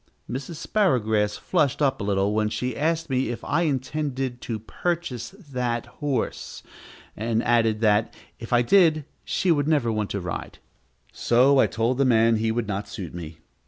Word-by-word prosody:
Mrs. 135 +7 -5
Sparrowgrass 110 - +1
flushed 155 -7 0
up 140 -5 +1
a - - -2
little 100 0 +1
when 105 0 +1
she 125 +2 -3
asked 165 +3 0
me 130 -4 0
if 120 - -5
I 155 +4 0
intended 135 -3 -2
to 115 - -3
purchase 145 - -3
that 125 - -4 0.2
horse, 140 -5 -3 0.5
and 115 +1 -1
added, 115 -2 +2
that, 105 -1 +3 0.3
if 115 - -9
I 120 0 +4
did, 155 0 +4 0.2
she 185 - 0
would 145 -3 +2
never 145 -7 +2
want 110 -2 -2
to 100 - -2
ride. 90 -2 -6 0.6
So 130 +3 +4
I - - +5
told 120 +3 -1
the 140 - +4
man 115 -2 +4
he 110 +1 0
would 115 -1 -2
not 100 0 -3
suit 95 -6 -7
me. 80 -2 -8
120 Hz, 170 wpm, -24 LUFS, 110-145 Hz, 0.6 s, I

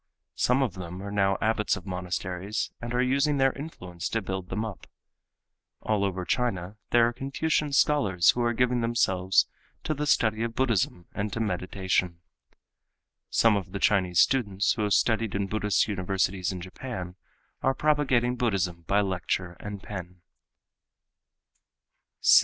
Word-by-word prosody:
Some 125 +2 +2
of 120 -9 -1
them 90 -1 -7
are 100 - -5
now 100 -1 +2
abbots 110 -1 +1
of 95 - -10
monasteries 90 +2 -3
and 120 0 -5
are 125 +1 +2
using 140 +3 +2
their 135 -1 +3
influence 90 - -6
to 115 - 0
build 95 -1 -4
them 110 +1 -2
up. 105 -5 -8 1.0
All 105 -2 +1
over 95 -2 -2
China 100 -6 -1
there 120 -1 +5
are 120 - -2
Confucian 145 +3 -1
scholars 100 - +4
who 120 - -3
are 120 0 +2
giving 125 +1 +1
themselves 95 -6 +2 0.4
to 155 - -1
the 150 0 -3
study 110 -5 +2
of 115 0 -2
Buddhism 110 -8 0
and 105 +1 -3
to - - -3
meditation. 90 -3 -1 1.1
Some 115 -2 +4
of 95 -1 -4
the 100 - -3
Chinese 95 -3 +2
students 105 -6 +3
who 110 - -4
have 105 -1 +1
studied 115 -3 +1
in 100 0 0
Buddhist 105 0 +1
universities 95 -2 -1
in 90 -1 -6
Japan 95 -1 -6 0.5
are 135 0 +2
propagating 130 -5 +2
Buddhism 95 -8 0
by 100 +1 +3
lecture 90 -2 -2
and 105 -1 -7
pen. 90 -3 -8
105 Hz, 150 wpm, -27 LUFS, 95-120 Hz, 1.1 s, there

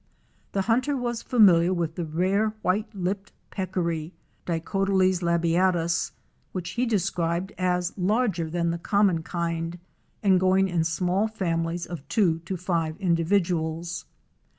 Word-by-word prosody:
The 195 - +1
hunter 255 +6 +1
was 240 -2 -2
familiar 185 -7 +5
with 165 -2 -1
the 170 0 -3
rare 190 +7 +1
White 205 +5 +1
lipped 195 +2 -3 0.2
Peccary 175 -3 -2 0.3
(Dicotyles 185 +2 +1
labiatus), 170 0 +2 0.4
which 180 -1 -4
he 245 +4 0
described 180 -3 -1
as 180 -1 0
larger 195 -3 0
than 170 0 0
the 170 - -3
common 200 -3 +2
kind 170 0 -3 0.5
and 190 -2 +5
going 190 +1 +3
in 170 -2 +1
small 180 +5 +1
families 170 -5 -2
of 165 -5 -8
two 175 -8 +2
to 185 +2 -3
five 165 -3 -1
individuals. 170 -2 0
180 Hz, 130 wpm, -26 LUFS, 170-195 Hz, 0.5 s, familiar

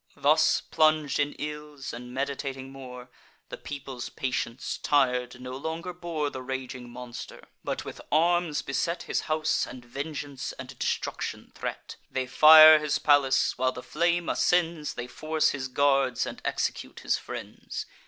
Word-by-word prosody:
Thus 150 +3 +4
plung'd 155 -3 +2
in 145 0 +1
ills, 150 -1 -6
and 125 +1 -8
meditating 135 0 -4
more— 125 -2 -10 0.4
The - - -6
people's 135 -4 -7
patience, 130 -1 -3
tir'd, 125 -3 +1
no 125 0 -7
longer 160 +5 -4
bore 165 -4 -3
The 130 - -6
raging 130 -1 -5
monster; 120 0 -9 0.2
but - - -3
with - - -8
arms 170 0 +2
beset 165 +5 -2
His - - -1
house, 155 0 +1
and 125 -1 -10
vengeance 140 +1 -5
and 130 0 -9
destruction - - -3
threat. - - -6
They 130 -1 -2
fire 155 +3 +9
his 150 -1 0
palace: 145 -3 +3
while 130 0 +2
the 125 - -8
flame 170 +4 0
ascends, 170 -3 +1
They 120 - -4
force 155 +5 0
his 130 -1 -3
guards, 135 -2 +2
and - - -7
execute - - -3
his - - 0
friends. - - -7
140 Hz, 145 wpm, -27 LUFS, 130-155 Hz, 0.4 s, fire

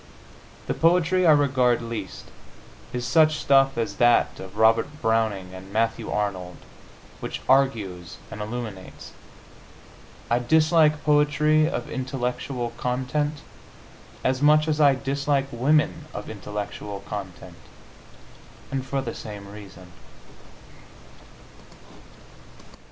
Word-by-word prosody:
The - - -1
poetry 180 +2 +3
I - - +8
regard 130 -5 +3
least 110 -5 -6 0.7
is 125 0 -4
such 155 +3 +4
stuff 135 -2 +3
as 110 -4 -2
that 120 0 +3
of 95 0 -10
Robert 115 +7 +3
Browning 110 -6 0
and 95 +1 -11
Matthew 115 +1 -1
Arnold, 95 -4 -3 0.6
which - - -6
argues 110 -10 +1
and 105 - -7
illuminates. 105 -3 -7 1.2
I 120 - +2
dislike 155 +3 +3
poetry 150 +1 +3
of 120 - -4
intellectual 125 -1 -3
content 140 +4 -2 0.8
as 130 +1 0
much 150 +1 +5
as 155 -1 0
I 140 -2 +6
dislike 140 +1 -1
women 150 +5 +1
of 105 - -6
intellectual 105 -1 -6
content 90 -4 -8 1.1
and 135 -1 -2
for 135 +1 -2
the 115 - -5
same 105 -2 -9
reason. 95 -3 -12
125 Hz, 105 wpm, -24 LUFS, 105-145 Hz, 1.2 s, I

